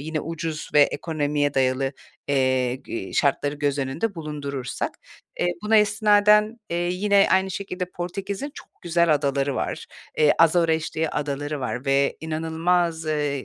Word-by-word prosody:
Yine 155 +1 -3
ucuz 160 -1 -5
ve 150 - +8
ekonomiye 145 -2 -1
dayalı, 135 0 +1 0.4
eee, 130 -2 +2
g 115 -6 -7
şartları 145 +1 +1
göz 145 -1 -1
önünde 140 +11 -2
bulundurursak. 145 -5 -4 0.5
Eee, - - +2 0.2
buna 220 +1 +3
istinaden, 210 +1 +4
eee, 170 - -1
yine 200 +2 +3
aynı 190 0 +3
şekilde 185 -1 -4
Portekiz’in 195 +9 -5
çok - - -12
güzel 170 -2 +3
adaları 140 -1 0
var. - - -3 0.3
Eee, 150 -1 +5
Azores 165 -1 +3
diye 160 0 0
adaları 145 0 -3
var 125 0 -3
ve 140 0 +2
inanılmaz, 160 +1 0
eee, 145 -3 -1
155 Hz, 140 wpm, -24 LUFS, 140-180 Hz, 0.5 s, ve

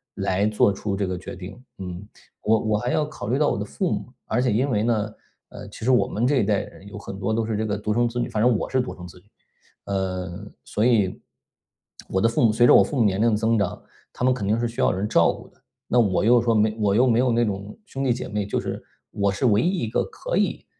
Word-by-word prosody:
来 95 +2 0
做 105 -1 +3
出 100 +1 -4
这 100 - 0
个 90 - -3
决 90 - -8
定， 95 +7 -10
嗯。 95 +1 -7 0.3
我 110 +1 +3
我 110 0 0
还 120 +3 -2
要 150 - +1
考 150 -9 -8
虑 125 +4 +1
到 150 0 +3
我 - - -1
的 105 - -2
父 175 - -2
母， - - -4
而 120 - 0
且 125 -1 +1
因 125 +6 +1
为 105 -2 +1
呢， 110 -2 0 0.4
呃， - - -10
其 110 - -9
实 130 - +4
我 125 - +3
们 115 - -1
这 140 +2 +2
一 120 - +3
代 100 -1 +1
人 95 - -12
有 100 0 -9
很 100 - -8
多 100 +3 -1
都 115 0 0
是 110 -1 -2
这 110 - -1
个 105 -1 -1
独 105 +1 -2
生 120 +1 +2
子 120 - -7
女 - - -1
反 105 - -2
正 120 -1 +4
我 - - -3
是 130 -1 +1
独 125 - -6
生 90 - -10
子 90 +1 -14
女， 90 - -28 0.6
嗯， 95 0 -4
所 105 - -2
以， 105 -7 +2 0.9
我 95 - -1
的 115 - +3
父 115 - 0
母 115 - +5
随 115 +3 +4
着 - - +7
我 - - +8
父 150 - -1
母 120 - +4
年 100 0 +1
龄 115 0 +4
的 105 - +2
增 110 +1 +1
长， 100 - -1 0.3
他 125 - -3
们 130 - +4
肯 105 -6 -4
定 110 +3 +1
是 120 - 0
需 115 - -4
要 - - +4
人 95 +3 -2
照 85 -6 +4
顾 - - -11
的。 - - -32 0.3
那 125 - +3
我 100 -3 +2
又 120 +1 +5
说 115 -1 +1
没 110 0 +2
我 100 -2 +2
又 120 +4 +5
没 115 -1 +3
有 125 -1 +3
那 120 +1 +2
种 100 -1 -5
兄 135 -8 -5
弟 130 - +2
姐 125 +1 -5
妹， 105 -2 -2
就 - - -1
是 - - -5 0.3
我 100 -1 0
是 100 - -2
唯 105 -1 +4
一 180 +5 0
一 115 - -1
个 - - 0
可 - - -5
以， - - 0
110 Hz, 305 characters per minute, -24 LUFS, 100-120 Hz, 0.9 s, 我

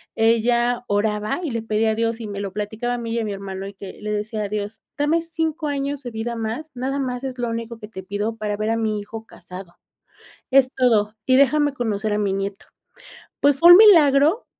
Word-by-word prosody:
Ella 235 +2 +2
oraba 210 +4 0
y 325 -6 -3
le 230 -1 -2
pedía 220 0 0
a - - -1
Dios 230 0 -1
y 225 - -6
me 200 -1 -5
lo 200 -1 -4
platicaba 215 +4 -3
a - - -4
mí 230 -1 -4
y 235 - 0
a - - -2
mi 210 - -3
hermano, 195 -1 -6
y 200 - -8
que 195 -1 -9
le 210 0 -4
decía 210 +1 -3
a 200 - -4
Dios, 210 +1 -4 0.2
"dame 300 +3 +2
5 325 -1 -3
años 280 0 -3
de 245 - -6
vida 225 +2 -4
más, 230 +8 -4
nada 265 +3 -2
más 250 -1 -3
es 260 -1 -5
lo 245 - -2
único 230 0 -5
que 210 - -9
te 190 -3 -9
pido 205 +4 -3
para 210 -2 -3
ver 215 +1 -1
a - - +1
mi 215 -2 -1
hijo 220 +2 -8
casado. 180 -4 -12 0.8
Es 265 -1 +6
todo, 220 -4 +2
y 260 - +4
déjame 290 +2 +4
conocer 215 -3 -2
a 210 - 0
mi 205 -2 0
nieto". 195 0 -4 0.7
Pues 285 -1 +3
fue 340 +4 +8
un 350 - +10
milagro 325 - +6
225 Hz, 225 wpm, -22 LUFS, 210-265 Hz, 0.8 s, un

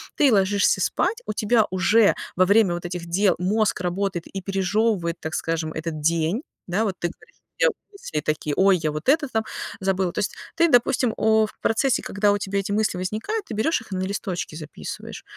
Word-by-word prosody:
ты 280 -4 +4
ложишься 200 0 +3
спать, 460 +2 0
у - - -1
тебя 220 -1 +3
уже 200 +3 +4 0.2
во 185 +1 +4
время 200 -2 +4
вот 175 0 -5
этих 175 -1 -5
дел 185 +2 +2
мозг 205 +2 +1
работает 180 -1 -2
и 195 - -4
пережёвывает, 195 -1 0
так 160 - -4
скажем, 165 -1 -2
этот 160 -1 -4
день. 165 - +1 0.3
Да, 195 +5 0
вот 190 -3 -2
ты 175 - -1
говоришь: - - -18 0.2
"Уберусь", 400 -1 -2
и - - -17
тебе 150 -1 -1
такие: 150 -1 -2
"Ой, 190 -1 +5
я 155 -2 -1
вот 150 - -3
это 300 +1 +3
там 220 -3 -1 0.4
забыла". 190 -2 0
То - - -3
есть - - -2 0.2
ты, 335 -1 +4
допустим, 245 -1 +3
о 220 0 +4
в - - -12
процессе, 255 +4 +2
когда 205 +1 +1
у 205 - +2
тебя 200 0 -3
эти 195 +1 -3
мысли 210 -3 +1
возникают, 220 - -3
ты 225 - -7
берёшь 225 +5 +1
их 220 - -16
и - - -2
на 185 - -1
листочке 185 -5 -4
записываешь. 155 -1 -8
195 Hz, 205 wpm, -23 LUFS, 175-220 Hz, 0.4 s, Ой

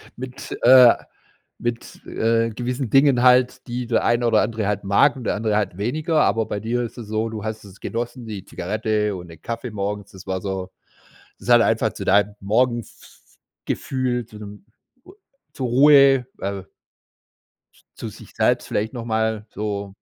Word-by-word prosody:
mit, 130 +1 -7
äh 125 -1 +8 0.7
mit, 120 0 -5
äh, 115 0 0
gewissen 125 +2 -3
Dingen 135 -1 +4
halt, 125 0 +4
die 120 +1 -3
der 115 - +1
eine 120 +1 +2
oder 110 -2 +4
andere 110 -2 -2
halt 105 -1 -2
mag 120 +8 +4
und 125 - -8
der - - 0
andere 105 0 0
halt 95 -4 -2
weniger, 150 - 0
aber 115 0 +1
bei 105 - -3
dir 120 +2 -1
ist 120 - -7
es 115 -3 -8
so, 110 +1 -1
du 110 -2 -6
hast 110 -1 -5
es 100 -1 -15
genossen, 120 +1 -4
die 105 -4 -7
Zigarette 105 +2 -2
und 90 - -10
den 80 -1 -14
Kaffee 115 +1 -5
morgens, 100 0 -4
das 95 -3 -13
war 95 0 -2
so 95 -1 -4 0.7
das - - -9
hat - - +7
einfach - - +2
zu - - -7
deinem 100 +1 +3
Morgenf 120 +4 +1 0.8
Gefühl 125 -2 -2
zu 110 -1 -14
'nem 105 -1 -11 0.4
a 370 - -14 0.4
zur 130 -2 -3
Ruhe, 135 0 +6
al 100 -1 -5 1.3
zu - - -5
sich - - -13
selbst - - +1
vielleicht 110 +2 -2
noch 120 -2 -5
mal 110 -1 -1
so 100 -1 -4
110 Hz, 175 wpm, -22 LUFS, 105-125 Hz, 1.3 s, äh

